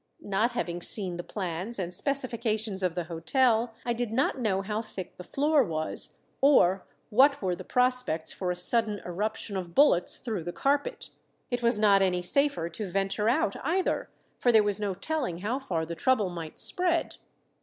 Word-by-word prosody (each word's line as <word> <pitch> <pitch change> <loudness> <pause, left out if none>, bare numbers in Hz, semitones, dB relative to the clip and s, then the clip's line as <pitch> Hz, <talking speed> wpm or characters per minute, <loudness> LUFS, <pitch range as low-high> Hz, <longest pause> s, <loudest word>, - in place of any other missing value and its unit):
Not 215 +4 +1
having 175 -7 -3
seen 185 -2 -1
the 175 - -5
plans 185 +4 -4
and 180 -2 -4
specifications 225 -4 -1
of 180 -3 0
the 175 - -1
hotel, 225 - +1
I 240 - +1
did 235 -1 -3
not 265 +3 +1
know 195 -5 0
how 210 +2 -2
thick 195 -5 -8
the 180 - -8
floor 290 - +2
was, 160 -6 -2 0.2
or 195 -10 +4 0.2
what 275 +6 +5
were 185 -3 -1
the - - -9
prospects 250 -10 0
for 185 - -3
a 180 - 0
sudden 210 +4 +1
eruption 205 +3 -3
of 175 -3 -5
bullets 275 -12 +4
through 215 -8 -4
the 175 - -3
carpet. 285 +1 -1 0.4
It 245 0 -1
was 235 -2 +2
not 205 -2 +5
any 180 -2 +1
safer 230 - +2
to 185 +4 -5
venture 195 +3 0
out 220 -4 +1
either; 360 +6 0 0.3
for 245 - +3
there 220 -2 +6
was 205 0 +1
no 200 -3 -2
telling 245 - -2
how 235 +7 -1
far 170 -12 -2
the 170 - -5
trouble 210 +3 +1
might 165 -3 -7
spread. 350 -2 +2
210 Hz, 180 wpm, -28 LUFS, 180-250 Hz, 0.4 s, there